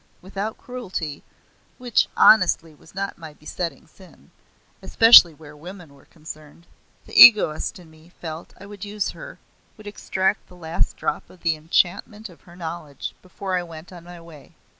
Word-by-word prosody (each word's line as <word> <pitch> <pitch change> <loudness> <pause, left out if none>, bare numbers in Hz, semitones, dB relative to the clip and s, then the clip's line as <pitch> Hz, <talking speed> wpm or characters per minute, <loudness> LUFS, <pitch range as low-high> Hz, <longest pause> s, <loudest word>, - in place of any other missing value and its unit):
Without 200 +4 -6
cruelty, 190 - -7 0.6
which 245 -3 0
honestly 165 -7 +4
was 155 +4 -21
not 195 -1 -5
my 160 -2 -11
besetting 165 +3 -6
sin 185 -2 -20 0.5
especially 225 -7 +7
where 150 -1 -15
women 175 0 -12
were 140 - -21
concerned, 155 0 -13 0.4
the - - -16
egoist 205 -10 +5
in 170 -3 -16
me 160 +1 -20
felt 160 0 -9
I 195 - -12
would 200 -1 -11
use 205 0 -4
her, - - -12 0.4
would 215 - -15
extract 200 -1 -2
the 180 - -17
last 165 -1 -3
drop - - -4
of 180 - -19
the 165 -2 0
enchantment 180 +7 -1
of 175 - -19
her 175 - -15
knowledge 160 -5 -7
before 185 +1 -5
I 180 - 0
went 165 +1 -12
on 175 -2 -12
my 175 0 -12
way. 165 -3 -16
175 Hz, 160 wpm, -22 LUFS, 160-200 Hz, 0.6 s, especially